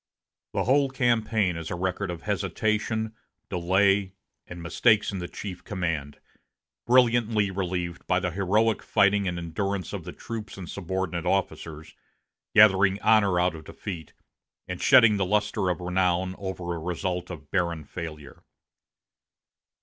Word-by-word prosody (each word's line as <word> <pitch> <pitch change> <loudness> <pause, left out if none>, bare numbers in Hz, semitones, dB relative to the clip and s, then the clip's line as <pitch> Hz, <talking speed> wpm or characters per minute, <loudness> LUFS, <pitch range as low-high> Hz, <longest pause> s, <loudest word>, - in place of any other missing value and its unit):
The - - 0
whole 135 +2 +3
campaign 115 -7 +1
is 85 -1 -6
a - - -3
record 95 +2 -2
of 85 -2 -6
hesitation, 110 +2 -1 0.4
delay, 95 +2 +2 0.3
and 90 - -8
mistakes 105 +6 +2
in 95 - -4
the 90 - -4
chief 95 -1 -7
command, 85 -7 -3 0.7
brilliantly 115 -4 +3
relieved 90 -2 -3
by 90 - +2
the 90 -1 -2
heroic 105 +5 +1
fighting 100 -1 +2
and 90 -1 -2
endurance 90 +2 -3
of - - -4
the - - -7
troops 110 -3 -7
and 90 -3 -7
subordinate 90 -2 -3
officers, 80 -4 -2 0.6
gathering 95 -2 +6
honor 105 -5 +4
out 90 0 +2
of 80 -1 -9
defeat, 85 -5 -7 0.5
and 90 -1 -5
shedding 110 -4 +6
the 95 - +1
luster 105 -1 0
of 90 - -1
renown 90 0 0
over 95 -3 -4
a 85 - -4
result 90 +1 -3
of 75 -5 -9
barren 85 -4 0
failure. 75 -3 -8
95 Hz, 140 wpm, -26 LUFS, 85-105 Hz, 0.7 s, gathering